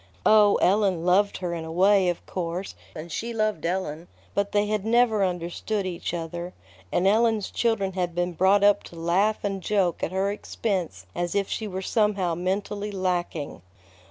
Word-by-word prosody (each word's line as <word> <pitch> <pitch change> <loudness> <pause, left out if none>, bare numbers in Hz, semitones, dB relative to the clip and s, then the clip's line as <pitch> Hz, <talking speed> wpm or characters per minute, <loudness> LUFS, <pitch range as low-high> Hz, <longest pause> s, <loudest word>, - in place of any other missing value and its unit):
Oh, 210 -1 +6
Ellen 190 -3 +2
loved 200 +3 +3
her 175 -2 -3
in 165 -1 -4
a 160 - -7
way, 190 +2 +4
of 175 - -4
course, 180 +1 -4 0.2
and 160 +1 -8
she 235 +9 -3
loved 215 -7 0
Ellen; 175 -2 -3 0.3
but 200 0 0
they 205 0 +2
had 210 -1 -1
never 225 -2 +3
understood 180 +3 -2
each 175 -2 -4
other, 170 +1 -5 0.4
and 180 - +1
Ellen's 220 0 +2
children 210 -5 0
had 180 -2 -2
been 175 0 -1
brought 190 +4 +3
up 205 0 +5
to - - -12
laugh 180 +6 +1
and 195 -2 -2
joke 190 -4 0
at - - -2
her 190 +2 0
expense 185 - -3
as 175 - -2
if 200 -1 +1
she 220 - -3
were 190 -1 -5
somehow 205 -5 +1
mentally 200 +4 -2
lacking. 180 - -2
190 Hz, 175 wpm, -25 LUFS, 175-205 Hz, 0.4 s, Oh